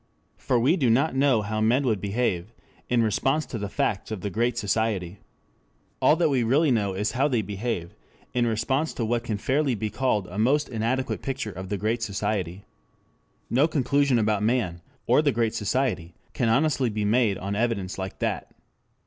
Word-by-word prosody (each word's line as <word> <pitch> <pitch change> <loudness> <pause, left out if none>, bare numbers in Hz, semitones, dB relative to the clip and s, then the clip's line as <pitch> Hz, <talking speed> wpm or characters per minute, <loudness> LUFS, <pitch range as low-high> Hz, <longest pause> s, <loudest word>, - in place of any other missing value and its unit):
For 125 - +1
we 135 +10 +3
do 130 -8 +2
not 135 +8 +3
know 135 -5 +3
how 110 +1 -2
men 120 +6 +3
would 110 -6 0
behave 100 -2 -1 0.4
in 120 -2 +3
response 135 +8 +1
to 115 - -6
the 100 -1 -4
facts 100 -1 -1
of 110 -4 -5
the 100 - -3
Great 120 +4 0
Society. 100 -4 -1 0.8
All 150 - +5
that 165 -1 +2
we 130 -3 +2
really 135 +6 +3
know 100 -5 +1
is 105 +3 -1
how 135 +4 +2
they 120 -6 0
behave 100 -3 -4 0.4
in 120 -1 +2
response 130 +7 0
to 115 - -1
what 115 +1 0
can 110 -3 -2
fairly 135 +4 +1
be 110 0 -3
called 125 -7 0
a 90 +3 -6
most 140 +7 +2
inadequate 125 +3 -1
picture 135 -5 -3
of 95 0 -8
the 100 - -1
Great 110 +4 -1
Society. 100 -3 -2 0.8
No 135 +6 +3
conclusion 140 -2 +2
about 110 -2 +1
man 105 -7 0 0.2
or - - +4
the 145 -2 +2
Great 115 -3 0
Society 105 -7 -1 0.2
can 120 - 0
honestly 135 0 +2
be 105 -1 -2
made 110 -2 +2
on 100 +2 -4
evidence 100 -5 -1
like 95 0 -5
that. - - -2
115 Hz, 185 wpm, -25 LUFS, 100-130 Hz, 0.8 s, All